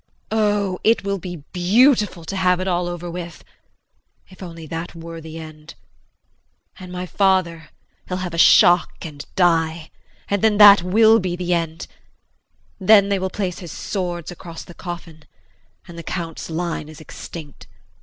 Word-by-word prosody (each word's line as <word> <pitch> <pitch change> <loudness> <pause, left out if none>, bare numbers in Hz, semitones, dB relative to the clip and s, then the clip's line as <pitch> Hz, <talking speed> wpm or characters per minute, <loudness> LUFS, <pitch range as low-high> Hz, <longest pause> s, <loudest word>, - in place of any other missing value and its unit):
Oh, 205 -3 0
it 225 -1 +3
will 200 0 -2
be 175 -4 -8
beautiful 205 - +3
to 195 - -5
have 180 -1 +2
it 185 - -3
all 175 -1 0
over 175 0 -5
with 170 0 -7 0.9
if 185 - -17
only 165 -3 -9
that 165 +2 -6
were 165 0 -9
the 160 0 -9
end! 155 0 -11 1.0
And 185 -1 -10
my 180 0 -5
father 180 -4 0 0.4
he'll 180 - -3
have 175 - -6
a - - -4
shock 175 +1 +6
and 145 -3 -8
die, 165 -3 +1 0.4
and 200 -1 -1
then 220 -2 +3
that 205 -2 +9
will 220 +5 +5
be 180 -3 -2
the 180 0 -1
end. 165 -1 -2 0.9
Then 200 +1 +5
they 200 -1 +1
will 190 0 -2
place 185 -2 -4
his 175 -5 -9
swords 175 -4 -4
across 170 -1 -9
the 175 - -13
coffin 170 -3 -9 0.6
and 170 -1 -10
the - - -5
Count's 165 -2 -5
line 165 -2 -3
is 155 0 -12
extinct. 155 -1 -10
175 Hz, 160 wpm, -21 LUFS, 165-190 Hz, 1.0 s, that